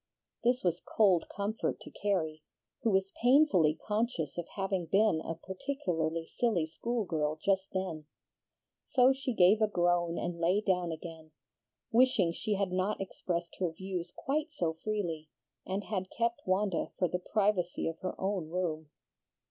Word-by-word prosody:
This 245 +1 +2
was 175 -1 +1
cold 190 -6 +3
comfort 205 +3 -2
to - - -10
Carrie, 160 -7 -1 0.4
who 230 - +2
was 195 -1 +1
painfully 245 - +5
conscious 210 - -1
of 175 -1 -4
having 195 -3 -1
been 195 -2 +3
a 165 - -4
particularly 170 - -2
silly 205 -5 0
school 230 +8 -2
girl 155 -3 0
just 190 +1 +1
then. 170 -5 -3 0.8
So 260 -1 +5
she 270 0 -3
gave 210 0 +5
a 215 - +5
groan 175 -3 +1
and 175 -1 -3
lay 175 +4 +3
down 180 -4 +1
again, 160 -1 -8 0.6
wishing 225 -7 +4
she 210 +5 -2
had 195 -2 0
not 185 +3 0
expressed 175 -3 -3
her 180 -2 +1
views 185 0 -5
quite 300 +4 -1
so 170 - -1
freely, 170 -8 -2 0.4
and 195 +2 -2
had 190 -3 -3
kept 235 -2 -2
Wanda 190 -1 +1
for 180 - +2
the 180 - -2
privacy 195 -2 0
of 165 0 -4
her 185 - -4
own 190 -4 -1
room. 160 -3 -2
185 Hz, 155 wpm, -31 LUFS, 170-210 Hz, 0.8 s, painfully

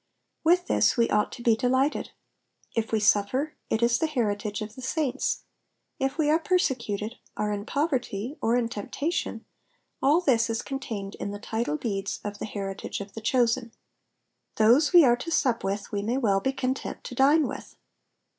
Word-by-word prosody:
With 355 +2 +4
this - - +2
we 235 -1 +2
ought 210 0 +2
to 240 - -8
be 230 -2 +4
delighted. 260 +5 +1 0.7
If 225 -1 -1
we 220 - +2
suffer, 210 +9 +2 0.2
it 220 +1 +1
is 235 0 +3
the 320 - +1
heritage 210 -6 -1
of 215 0 -8
the 260 - -10
saints; 275 0 -1 0.6
if 270 +2 -1
we 310 -2 +2
are 320 - +4
persecuted, 245 - -1 0.2
are 210 0 0
in 205 0 -4
poverty, 265 -5 -1
or 230 +2 +2
in 245 -2 +1
temptation, 275 +9 -3 0.6
all 290 +5 +4
this 240 -9 +2
is 225 0 -2
contained 225 -8 -5
in - - -3
the 205 - -5
title 220 -7 -2
deeds 195 0 -3
of 205 0 -5
the - - -3
heritage 195 -2 -5
of 200 -1 -8
the 225 - -7
chosen. 235 0 +1 0.8
Those 245 +8 +5
we 345 -4 +8
are 240 -1 +4
to 335 - -6
sup 250 -7 +1
with 200 +3 -3
we 205 -1 -1
may 230 +5 -1
well 205 -7 +2
be 265 +7 0
content 260 0 -3
to - - -7
dine 285 +5 +4
with. - - -8
235 Hz, 180 wpm, -27 LUFS, 210-270 Hz, 0.8 s, we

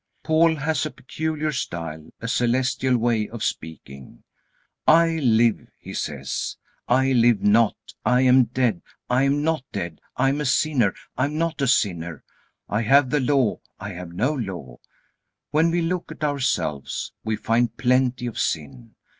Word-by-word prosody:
Paul 160 +1 +3
has 150 -1 -1
a 155 - -2
peculiar 155 +2 -3
style, 80 - -5
a 115 - -5
celestial 125 +2 +1
way 115 -2 0
of 115 -2 -6
speaking. 75 -8 -6 0.6
"I 165 0 +5
live," 115 -5 +2
he - - -10
says, 70 -3 -4 0.3
"I 130 +2 +3
live 120 -4 +4
not; 105 +1 +4 0.3
I 125 0 +3
am 130 -1 +5
dead, 120 -5 0 0.3
I 130 +2 +3
am 145 +2 +1
not 160 -3 0
dead; 85 -5 -5 0.2
I 135 - +3
am 145 +2 -1
a - - -2
sinner, 130 -6 +2 0.2
I 130 - +3
am 150 +2 -3
not 165 -2 -1
a 135 - +2
sinner; 85 - 0 0.4
I 105 +3 0
have 130 +3 +4
the 150 - +2
Law, 130 -4 +1 0.2
I 100 - -6
have 90 -1 -8
no 120 - 0
Law." 90 - -6 0.7
When 160 +2 +3
we 170 0 0
look 180 +1 -2
at - - -8
ourselves 130 - -1
we 110 0 -1
find 115 +2 0
plenty 125 -1 +1
of 120 - -4
sin. 95 - -3
125 Hz, 160 wpm, -23 LUFS, 105-145 Hz, 0.7 s, I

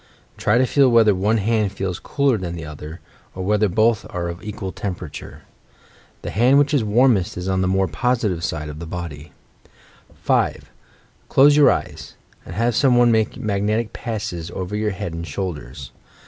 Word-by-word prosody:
Try 105 +3 +1
to 130 - +4
feel 135 0 +4
whether 115 -3 +5
one 105 +4 +1
hand 105 -1 0
feels 95 -2 -3
cooler 140 -3 +1
than 85 -2 -5
the 80 -1 -7
other; 75 +2 -9 0.3
or 95 - -4
whether 105 +1 +2
both 110 +3 +2
are 85 -1 -3
of 85 +1 -7
equal 105 -2 -5
temperature. 90 -6 -7 0.8
The - - -4
hand 125 +6 +4
which 145 +1 +3
is 140 -6 +2
warmest 110 -4 +2
is 90 +1 -4
on 95 -1 0
the 95 - +1
more 95 0 +1
positive 100 0 -1
side 75 -2 -3
of 75 0 -8
the 85 - -7
body, 80 -3 -7 0.9
5. - - 0 0.6
Close 145 +2 +6
your 150 -1 +6
eyes, - - -3 0.3
and - - -8
have 115 +1 +1
some 130 -2 +4
one 120 -1 +5
make 110 -1 +1
mag 100 -2 -2
netic 110 +2 -1
passes 105 -8 -5
over 95 +2 -5
your 105 0 0
head 95 -3 -5
and 85 0 -6
shoulders. 70 -6 -6
100 Hz, 180 wpm, -21 LUFS, 85-115 Hz, 0.9 s, Close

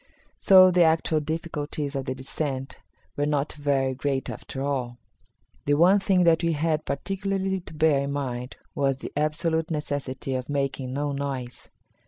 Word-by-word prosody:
So 185 -1 +7
the 180 0 +3
actual 160 -1 +3
difficulties 150 -2 -4
of 135 -1 -2
the 130 - -3
descent 135 0 -4 0.4
were 145 0 0
not 145 -1 0
very 140 -3 0
great 135 0 -2
after 135 - -6
all. 130 -4 -2 0.7
The 145 - +3
one 180 +6 +5
thing 190 -2 +3
that 165 -1 +4
we 170 -1 +1
had 155 0 0
particularly 195 +5 -2
to 175 - -12
bear 155 -2 +3
in 140 0 -2
mind 125 -3 -4 0.2
was 135 -2 +1
the - - -8
absolute 160 +2 0
necessity 145 -4 -3
of 130 0 -3
making 135 -2 -2
no 145 +1 -1
noise. 135 -3 -5
145 Hz, 160 wpm, -26 LUFS, 135-160 Hz, 0.7 s, So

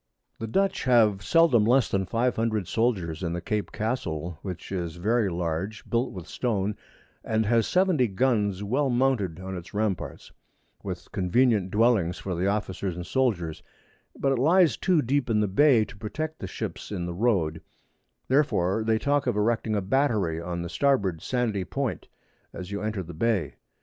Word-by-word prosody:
The 115 - -4
Dutch 195 - 0
have 110 -6 +4
seldom 165 -8 +4
less 125 +3 +4
than 95 -1 -1
500 115 -4 0
Soldiers 95 -9 0
in 85 -2 -2
the 85 - -2
Cape 105 +4 -3
Castle, 85 -8 -3
which 90 -3 -7
is 85 -4 -3
very 105 +4 +1
large, 85 +4 -3
built 120 +2 0
with 90 -3 -8
Stone, 105 -4 -1 0.5
and 110 0 0
has 115 +1 +2
70 180 -9 +3
Guns 105 -3 0
well 135 +7 +1
mounted 120 -9 +1
on 95 0 -6
its 90 +1 -9
Ramparts, 105 -4 -3 0.5
with - - -7
convenient 100 +1 +2
Dwellings 105 -4 +2
for 95 - -4
the 90 +3 0
Officers 100 -3 -2
and 90 0 -6
Soldiers; 95 -11 -1 0.6
but 135 - +1
it 135 - +1
lies 165 - +4
too 180 -5 +2
deep 130 +1 0
in 110 -2 +2
the 105 - +2
Bay 115 +2 +4
to - - -13
protect 155 +10 -5
the 95 - -5
Ships - - -6
in 90 -4 -3
the 85 - -4
Road; 85 -6 0 0.7
therefore 110 -8 +2
they 110 0 +2
talk 140 +3 0
of 120 - +1
erecting 110 0 +1
a 100 - +1
Battery 100 - +1
on 85 0 -4
the 85 - -5
Starboard 100 - +1
sandy 115 -6 -1
Point, 135 +6 -3 0.5
as 90 +1 -7
you 100 - -3
enter 105 -3 -2
the 85 +1 -9
Bay. 105 +2 0
105 Hz, 170 wpm, -26 LUFS, 90-125 Hz, 0.7 s, have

